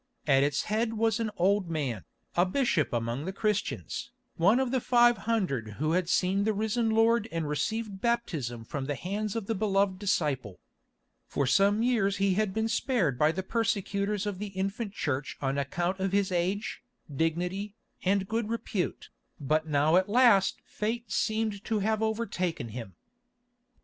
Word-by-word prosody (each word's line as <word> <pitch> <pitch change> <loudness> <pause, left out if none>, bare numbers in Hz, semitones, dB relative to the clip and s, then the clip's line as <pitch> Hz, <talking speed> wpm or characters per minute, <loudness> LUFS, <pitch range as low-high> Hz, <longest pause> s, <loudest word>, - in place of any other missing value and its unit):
At 135 -2 +4
its 140 0 +1
head 220 +2 0
was 225 0 +1
an 225 -1 0
old 190 0 +2
man, 135 - -2 0.3
a 175 - +5
bishop 185 - +1
among 120 +4 -2
the 190 - -2
Christians, 210 +1 -2 0.3
one 195 +8 +4
of 260 -2 0
the 260 -2 +1
five 240 0 +5
hundred 135 - 0
who 155 +2 0
had 175 0 +1
seen 190 +2 +2
the 215 +1 +1
risen 220 +2 0
Lord 225 0 +3
and 165 -2 -2
received 200 +6 -2
baptism 155 - -1
from 135 +2 -4
the 145 - -1
hands 205 - -3
of 225 -3 -2
the 225 - -1
Beloved 195 -2 +1
Disciple. 145 - -1 0.7
For 140 - 0
some 200 - +3
years 210 -5 +2
he 195 0 +2
had 210 0 +1
been 220 +3 0
spared 225 - 0
by 150 +1 +4
the 190 +3 -4
persecutors 205 -2 -1
of 200 -3 -3
the 210 - -3
infant 195 +2 -3
Church 145 -6 -2
on 135 0 -1
account 175 +7 -1
of 190 0 -1
his 200 -1 +2
age, 185 +5 -1 0.3
dignity, 180 +7 -1 0.3
and 195 0 +1
good 225 0 -1
repute, 220 -5 -3 0.3
but 155 +2 0
now 155 +3 +3
at 185 +2 +2
last 230 -4 +4
fate 225 +1 -3
seemed 215 +1 0
to 220 - 0
have 215 +1 0
overtaken 215 - -2
him. 110 -5 -8
195 Hz, 165 wpm, -29 LUFS, 160-220 Hz, 0.7 s, a